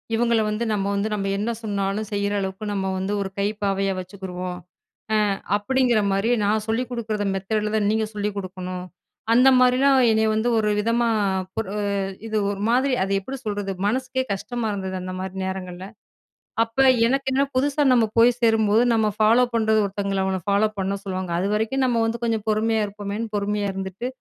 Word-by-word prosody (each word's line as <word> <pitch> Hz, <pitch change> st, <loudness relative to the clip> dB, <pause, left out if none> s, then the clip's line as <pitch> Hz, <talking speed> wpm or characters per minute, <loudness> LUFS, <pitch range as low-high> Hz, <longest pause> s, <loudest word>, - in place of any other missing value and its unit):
இவங்கள 235 Hz, -1 st, +2 dB
வந்து 210 Hz, +2 st, -2 dB
நம்ம 200 Hz, -2 st, -1 dB
வந்து 200 Hz, +2 st, 0 dB
நம்ம 195 Hz, -1 st, -1 dB
என்ன 215 Hz, +3 st, -1 dB
சொன்னாலும் 205 Hz, 0 st, -2 dB
செய்ற 200 Hz, 0 st, -1 dB
அளவுக்கு, 190 Hz, +2 st, -4 dB
நம்ம 190 Hz, -1 st, -1 dB
வந்து 190 Hz, +2 st, -2 dB
ஒரு 195 Hz, -, -3 dB
கைப்பாவையா 200 Hz, -1 st, 0 dB
வச்சுக்குருவோம். 185 Hz, -1 st, -6 dB, 0.7 s
அ -, -, +2 dB, 0.2 s
அப்பிடிங்கிறமாரியே 220 Hz, -2 st, +1 dB
நான் 215 Hz, +1 st, +1 dB
சொல்லிக் 230 Hz, +2 st, -1 dB
கொடுக்கிற 220 Hz, -3 st, -2 dB
மெத்தேர்ட்ல 210 Hz, +2 st, -2 dB
தான் 205 Hz, -1 st, +1 dB
நீங்க 220 Hz, 0 st, +1 dB
சொல்லிக் 205 Hz, 0 st, -2 dB
கொடுக்கணும். 185 Hz, -1 st, -5 dB, 0.5 s
அந்த 250 Hz, +3 st, +6 dB
மாதிரிலாம் 260 Hz, +2 st, +4 dB
என்னைய 220 Hz, 0 st, +2 dB
வந்து 220 Hz, +2 st, 0 dB
ஒருவிதமா 220 Hz, +2 st, +1 dB, 0.5 s
ஒரு 195 Hz, -3 st, -3 dB, 0.5 s
இது 220 Hz, -1 st, -2 dB
ஒரு 200 Hz, -1 st, -3 dB
மாதிரி 255 Hz, +3 st, +2 dB
அது 195 Hz, -, -3 dB
எப்படி 265 Hz, +8 st, -6 dB
சொல்றது, 205 Hz, -2 st, -2 dB
மனசுக்கே 260 Hz, +4 st, 0 dB
கஷ்டமா 225 Hz, +4 st, -3 dB
இருந்தது, 190 Hz, -2 st, -4 dB
அந்தமாரி 185 Hz, +1 st, -5 dB
நேரங்கள்ல. 185 Hz, -1 st, -5 dB, 0.8 s
அப்ப 230 Hz, +2 st, -5 dB, 0.3 s
எனக்கு 270 Hz, +2 st, 0 dB
என்ன 270 Hz, +1 st, +3 dB
புதுசா 285 Hz, +2 st, +2 dB
நம்ம 240 Hz, -2 st, +4 dB
போய் 235 Hz, +2 st, +7 dB
சேரும்போது 225 Hz, -1 st, +3 dB
நம்ம 220 Hz, -1 st, +2 dB
ஃபாலோப் 235 Hz, +3 st, +4 dB
பண்றது 220 Hz, -1 st, +3 dB
ஒருத்தங்கள 195 Hz, -1 st, -2 dB
அவன 190 Hz, 0 st, 0 dB
ஃபாலோப் 210 Hz, +2 st, +2 dB
பண்ண 195 Hz, +1 st, -1 dB
சொல்லுவாங்க. 185 Hz, -2 st, -4 dB
அது 185 Hz, -, 0 dB
வரைக்கும் 225 Hz, +5 st, 0 dB
நம்ம 240 Hz, -2 st, +1 dB
வந்து 225 Hz, +1 st, -1 dB
கொஞ்சம் 225 Hz, -2 st, -1 dB
பொறுமையா 220 Hz, +1 st, +1 dB
இருப்போமேன்னு 205 Hz, +2 st, -5 dB
பொறுமையா 205 Hz, 0 st, -1 dB
இருந்துட்டு, 190 Hz, +4 st, -5 dB
210 Hz, 160 wpm, -23 LUFS, 195-230 Hz, 0.8 s, போய்